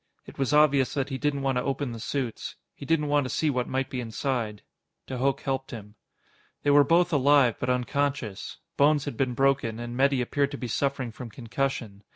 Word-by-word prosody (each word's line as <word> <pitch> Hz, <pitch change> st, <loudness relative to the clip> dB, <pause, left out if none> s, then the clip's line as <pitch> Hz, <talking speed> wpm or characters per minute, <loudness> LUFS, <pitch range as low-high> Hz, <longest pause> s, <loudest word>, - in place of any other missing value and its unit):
It -, -, -13 dB
was 135 Hz, 0 st, +1 dB
obvious 150 Hz, -2 st, +4 dB
that 135 Hz, -1 st, -1 dB
he 135 Hz, -1 st, -4 dB
didn't 145 Hz, -2 st, -1 dB
want 135 Hz, -2 st, +1 dB
to -, -, -2 dB
open 135 Hz, -1 st, -2 dB
the 115 Hz, -, -7 dB
suits. 125 Hz, 0 st, -3 dB, 0.2 s
He 140 Hz, -, -10 dB
didn't 160 Hz, -1 st, +2 dB
want 145 Hz, 0 st, +2 dB
to -, -, -4 dB
see 155 Hz, +2 st, +1 dB
what 125 Hz, -2 st, -2 dB
might 130 Hz, 0 st, -1 dB
be 125 Hz, -, -4 dB
inside. 115 Hz, -2 st, -3 dB, 0.4 s
De 130 Hz, -2 st, -5 dB
Hooch 135 Hz, +1 st, 0 dB
helped 135 Hz, -1 st, -2 dB
him. 105 Hz, -4 st, -9 dB, 0.7 s
They 145 Hz, -, +3 dB
were 145 Hz, 0 st, +7 dB
both 170 Hz, +4 st, +3 dB
alive, 140 Hz, -4 st, +4 dB
but 125 Hz, -, -2 dB
unconscious. 125 Hz, -3 st, -1 dB, 0.2 s
Bones 145 Hz, 0 st, +4 dB
had 145 Hz, -, -4 dB
been 125 Hz, 0 st, -1 dB
broken, 135 Hz, -4 st, +1 dB
and 120 Hz, 0 st, -5 dB
Metty 135 Hz, +1 st, +3 dB
appeared 140 Hz, +3 st, 0 dB
to 140 Hz, -, -6 dB
be 125 Hz, -, -4 dB
suffering 135 Hz, 0 st, -1 dB
from 120 Hz, +1 st, -8 dB
concussion. 115 Hz, -3 st, -3 dB
135 Hz, 205 wpm, -27 LUFS, 125-140 Hz, 0.7 s, were